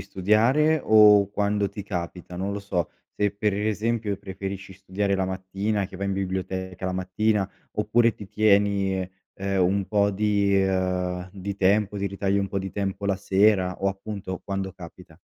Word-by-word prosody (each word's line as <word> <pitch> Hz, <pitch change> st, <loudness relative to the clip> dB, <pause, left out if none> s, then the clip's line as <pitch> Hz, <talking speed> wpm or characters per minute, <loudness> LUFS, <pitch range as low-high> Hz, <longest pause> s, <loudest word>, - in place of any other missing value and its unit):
studiare 120 Hz, -, +2 dB
o 105 Hz, -2 st, +6 dB
quando 100 Hz, 0 st, 0 dB
ti 100 Hz, +1 st, -7 dB
capita? 90 Hz, -2 st, -6 dB
Non 95 Hz, +2 st, -2 dB
lo 100 Hz, -, -4 dB
so, 90 Hz, -3 st, -2 dB, 0.3 s
se 105 Hz, -1 st, +1 dB
per 105 Hz, 0 st, 0 dB
esempio 105 Hz, +1 st, -1 dB
preferisci 95 Hz, 0 st, -7 dB
studiare 100 Hz, +1 st, -2 dB
la 95 Hz, -, 0 dB
mattina, 95 Hz, +2 st, -2 dB
che 95 Hz, -, -11 dB
vai 100 Hz, +1 st, -3 dB
in 100 Hz, -, -1 dB
biblioteca 95 Hz, -1 st, -4 dB
la 95 Hz, -, -1 dB
mattina, 95 Hz, +2 st, 0 dB, 0.2 s
oppure 115 Hz, +2 st, +2 dB
ti 100 Hz, -, -10 dB
tieni, 100 Hz, -2 st, +2 dB, 0.4 s
ehm, 95 Hz, -1 st, -1 dB
un 95 Hz, +1 st, +1 dB
po' 100 Hz, -1 st, +2 dB
di, 100 Hz, -1 st, +1 dB
ehm 90 Hz, -1 st, 0 dB
di 100 Hz, 0 st, -5 dB
tempo, 100 Hz, +1 st, +2 dB
ti 100 Hz, -, -1 dB
ritagli 100 Hz, 0 st, 0 dB
un 100 Hz, -, 0 dB
po' 100 Hz, 0 st, -3 dB
di 95 Hz, -1 st, -5 dB
tempo 100 Hz, 0 st, -3 dB
la 100 Hz, -, +1 dB
sera 95 Hz, -1 st, +2 dB
o 100 Hz, -, +3 dB
appunto 95 Hz, -1 st, -5 dB
quando 95 Hz, -1 st, -3 dB
capita? 90 Hz, -2 st, -13 dB
100 Hz, 170 wpm, -25 LUFS, 95-105 Hz, 0.4 s, o